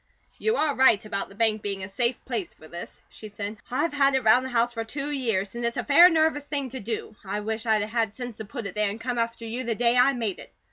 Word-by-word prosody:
"You 440 +1 +1
are 305 -2 +2
right 260 -6 +4
about 210 -2 -3
the 195 - -15
bank 220 -1 +1
being 200 -2 -3
a - - -5
safe 235 +5 -1
place 230 -8 -4
for 155 - -15
this," 170 +2 -9
she 215 - -11
said. 205 +1 -6
"I've 290 +6 0
had 275 -1 +4
it 265 - +1
round 245 +4 +5
the 260 - -4
house 240 -1 +1
for 225 -1 -3
two 275 +6 -4
years, 225 -8 -1
and 235 0 -5
it's 235 0 -1
a - - -1
fair 340 +5 +8
nervous 315 -3 +2
thing 280 -3 -2
to 260 - -5
do. 220 0 -5
I 205 +1 -3
wish 220 +2 -4
I'd 215 -2 +3
a - - -1
had 225 0 0
sense 245 0 -7
to 220 - -7
put 235 +1 -6
it 200 - -5
there 210 -1 +1
and 210 +3 -6
come 240 0 -2
after 230 0 -2
you 235 +3 -3
the 235 -2 -1
day 235 +1 +2
I 250 +3 +5
made 225 -7 -3
it. - - -12
230 Hz, 280 wpm, -26 LUFS, 210-260 Hz, -, fair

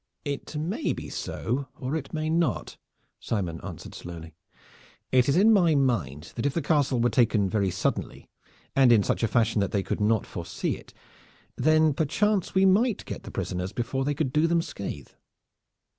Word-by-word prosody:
"It 145 +1 -4
may 180 - -1
be - - -7
so, 130 +4 -3
or 130 +4 -3
it 150 -4 -4
may 155 -1 -2
not," 165 +1 0 0.4
Simon 90 -7 -3
answered - - -8
slowly. 85 -1 -9 0.8
"It 130 0 +4
is 140 - +3
in 220 +4 +6
my 175 -6 +4
mind 100 - -1
that 120 +4 0
if 140 - -2
the 170 - +1
castle 140 -4 +2
were 120 +1 +2
taken 115 -5 +3
very 100 0 +1
suddenly, - - -2 0.5
and 130 -3 +6
in 110 -4 +5
such - - -1
a 115 - +2
fashion 115 -2 +2
that 100 - -1
they 100 -2 0
could - - -3
not 110 0 +2
foresee 85 -1 -3
it, - - -14 0.6
then 155 0 +4
perchance 190 +8 0
we 190 0 +5
might 210 +4 +3
get - - -6
the - - -9
prisoners 90 +1 -3
before 130 +3 -2
they 145 +1 -1
could 135 -3 -1
do 155 +2 +3
them 170 0 +2
scathe." 95 - -6
135 Hz, 180 wpm, -27 LUFS, 105-160 Hz, 0.8 s, in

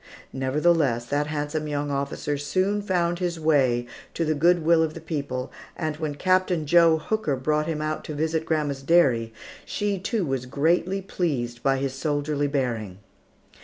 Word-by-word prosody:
Nevertheless, 135 -2 +1
that 145 +3 -1
handsome 150 +1 -3
young 145 -1 -2
officer 140 +1 -2
soon 185 +8 0
found 175 -3 0
his 175 -2 -2
way 135 -6 +2 0.3
to 165 - 0
the 155 - +1
good 170 +2 +3
will 165 0 +5
of 160 -1 -1
the - - -6
people, 140 -5 -4 0.3
and 155 -2 -2
when 155 -2 -3
Captain 185 -1 +1
Joe 165 +1 +5
Hooker 160 -3 -1
brought 150 +4 0
him 155 -2 -2
out 155 0 -2
to 155 - -5
visit 160 +1 0
grandma's 150 -4 -1
dairy, 135 -7 +3 0.3
she, 205 -2 -2
too, 205 0 -1
was 135 -3 -2
greatly 170 +8 +1
pleased 125 -11 -2
by 135 0 +2
his 135 -1 -2
soldierly 145 +1 -1
bearing. 120 -9 -2
150 Hz, 165 wpm, -25 LUFS, 140-170 Hz, 0.3 s, will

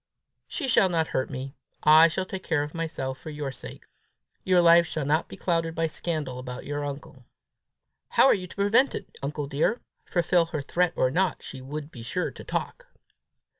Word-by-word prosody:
"She 285 - -3
shall 195 -6 +4
not 165 -2 0
hurt 130 - -1
me. 135 0 -6 0.3
I 155 +2 +8
will 190 - 0
take 190 0 -6
care 160 -5 0
of 150 - -7
myself 155 -6 -4
for - - -8
your 145 -2 -4
sakes. 130 - -10 0.6
Your 185 -1 +4
life 170 0 +6
shall 155 -3 -3
not 155 +3 +1
be - - -10
clouded 165 -2 0
by 165 0 +1
scandal 155 -5 -3
about 125 0 -7
your 145 0 -3
uncle." 145 0 -7 0.8
"How - - +5
are 270 - +7
you 185 -2 -3
to - - -13
prevent 210 +7 +3
it, - - -8
uncle 145 +1 -3
dear? 150 - 0 0.3
Fulfil 175 -1 +2
her 160 -3 -3
threat 175 +4 +1
or 130 - +2
not, 180 +2 0
she 130 - -8
would 145 +3 -6
be 120 - -10
sure 150 +10 -2
to - - -11
talk!" - - -4
160 Hz, 195 wpm, -26 LUFS, 140-175 Hz, 0.8 s, I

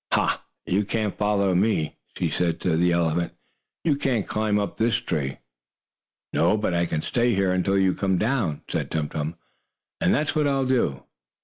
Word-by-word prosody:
"Ha! - - +1 0.2
Now - - -2
you 100 +3 +3
can't 105 0 -1
follow 100 -2 +2
me!" 90 -4 +1 0.2
she - - +1
said 85 -2 0
to 85 -3 +1
the 90 +2 +3
elephant. 85 0 +1 0.5
"You 155 -4 +3
can't 125 -7 0
climb 110 -1 +1
up 100 -1 -2
this 115 +1 +2
tree!" 80 - -2 1.0
"No, 85 +6 +3
but 105 -4 -1
I 85 0 +1
can 80 -1 -2
stay 120 -2 +1
here 95 -1 +2
until 95 +2 +1
you 95 -1 +3
come 95 -1 0
down," 110 - 0
said - - -2
Tum 75 -2 -1
Tum, 80 +2 -3 0.6
"and - - +2
that's 150 +1 +1
what 150 -1 +2
I'll 135 -1 +1
do." 120 - +1
95 Hz, 185 wpm, -25 LUFS, 85-115 Hz, 1.0 s, you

